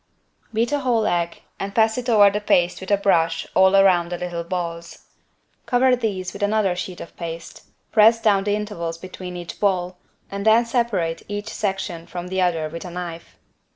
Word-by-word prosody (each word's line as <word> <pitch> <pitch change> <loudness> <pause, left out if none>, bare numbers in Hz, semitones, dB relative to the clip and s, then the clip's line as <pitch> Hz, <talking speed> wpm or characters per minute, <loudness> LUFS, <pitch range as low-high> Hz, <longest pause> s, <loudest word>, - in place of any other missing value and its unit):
Beat 230 +3 0
a 290 - +1
whole 240 -5 +1
egg 170 -1 -1 0.2
and 200 0 -5
pass 220 -1 +3
it 250 0 -3
over 205 -3 +6
the 210 +1 -2
paste 175 -3 +2
with 190 - -7
a 205 - +4
brush 165 -4 +1
all 190 +1 +5
around 185 -3 +4
the 175 - -2
little 175 -1 -4
balls. 170 -1 -5 0.6
Cover 255 0 +4
these 195 -6 -3
with 200 - -9
another 205 -3 +1
sheet 180 0 -5
of - - -10
paste, 165 -1 -8 0.2
press 225 +1 +6
down 205 -3 +3
the 205 0 +1
intervals 170 -6 -4
between 180 0 -8
each 175 -1 -8
ball, 180 -3 0 0.3
and 200 0 -4
then 220 +2 +5
separate 220 -9 -1
each 205 +1 -5
section 190 -5 -3
from 180 0 -6
the 190 0 0
other 165 -3 +1
with 165 +2 -7
a 180 - -7
knife. 175 -1 -7
190 Hz, 190 wpm, -22 LUFS, 175-210 Hz, 0.6 s, over